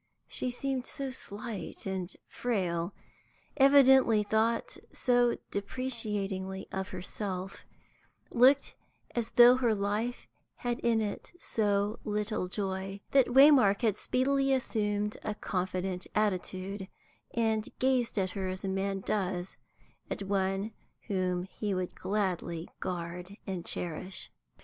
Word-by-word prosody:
She 255 - -2
seemed 255 +1 -2
so 275 -3 -4
slight 220 -3 -7
and 190 -1 -3 0.2
frail, 180 -7 -1 0.6
evidently 265 -5 +6
thought 220 +2 +1
so 245 -1 +3
depreciatingly 200 -4 -2
of 190 0 -3
herself, 185 +1 -5 0.7
looked 260 +4 +5 0.4
as 235 -2 -1
though 245 +1 +8
her 235 -4 +2
life 210 +4 -2 0.3
had 240 -1 -2
in 230 -1 +2
it 205 -2 -4
so 205 -5 0
little 210 -2 -1
joy, 195 0 -3
that 270 -2 +5
Waymark 255 -5 +6
had 215 -4 +3
speedily 270 +4 +1
assumed 210 -4 0
a 210 - -2
confident 185 -1 -2
attitude, 195 -1 -1 0.5
and 220 -2 +1
gazed 255 -3 +1
at 190 -2 +1
her 190 -2 -3
as 185 +1 -5
a - - -2
man 195 0 -1
does 185 -3 -2 0.5
at - - -3
one 195 +1 0 0.4
whom 185 -2 0
he 195 +1 -3
would 185 -1 -2
gladly 185 -4 -2
guard 180 +2 -5
and 185 -4 -4
cherish. 180 +3 -4
205 Hz, 115 wpm, -31 LUFS, 190-240 Hz, 0.7 s, though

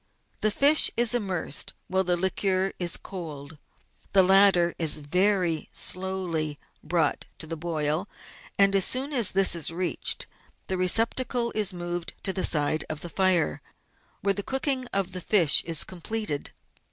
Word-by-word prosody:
The 215 - +2
fish 285 +8 +7
is 240 0 +2
immersed 190 - -3
while 190 0 0
the 180 -1 0
liquor 190 +1 -1
is 175 -2 -1
cold; 155 -5 -9 0.5
the 190 -1 +6
latter 190 -2 +4
is 155 -2 +1
very 180 +1 0
slowly 180 -5 -3 0.3
brought 160 -1 -1
to - - -6
the 165 +1 -5
boil, 160 +2 -2 0.5
and 195 0 +4
as 195 - +3
soon 270 +7 0
as 235 -7 +4
this 195 -2 +3
is 170 -4 0
reached, 175 +1 0 0.4
the 190 - -3
receptacle 230 +6 0
is 210 -3 0
moved 175 -1 -5
to 190 - -1
the 185 - -1
side 150 0 +1
of 155 -1 -5
the 175 - -7
fire, 180 - +1 0.6
where 200 0 +1
the 200 - -4
cooking 265 +2 -1
of 195 -2 -1
the 185 - -5
fish 175 -6 +4
is 165 -2 0
completed. 185 -3 -4
185 Hz, 150 wpm, -25 LUFS, 165-200 Hz, 0.6 s, fish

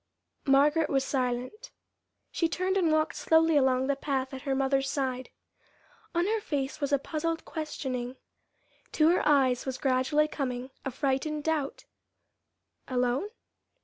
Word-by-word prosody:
Margaret 295 +3 +4
was 270 -1 +2
silent. 255 - -2 0.6
She 330 - 0
turned 370 +3 -1
and 350 -5 +2
walked 310 0 +1
slowly 320 0 +3
along 260 -2 +3
the 280 +1 +1
path 270 -1 -2
at 265 - -6
her 270 - +2
mother's 270 0 +1
side. 260 -2 -2 0.9
On 345 +1 +2
her 435 +2 0
face 285 -4 -3
was 285 0 -1
a 280 - +5
puzzled 325 +3 -3
questioning. 260 -5 -4 0.8
To 310 0 +4
her 355 - +3
eyes 265 -4 +3
was 260 -1 -2
gradually 265 +3 +2
coming 255 -3 -4
a - - -2
frightened 280 +3 -1
doubt. 305 -3 -2 1.0
Alone? 250 +8 0
275 Hz, 140 wpm, -29 LUFS, 260-315 Hz, 1.0 s, a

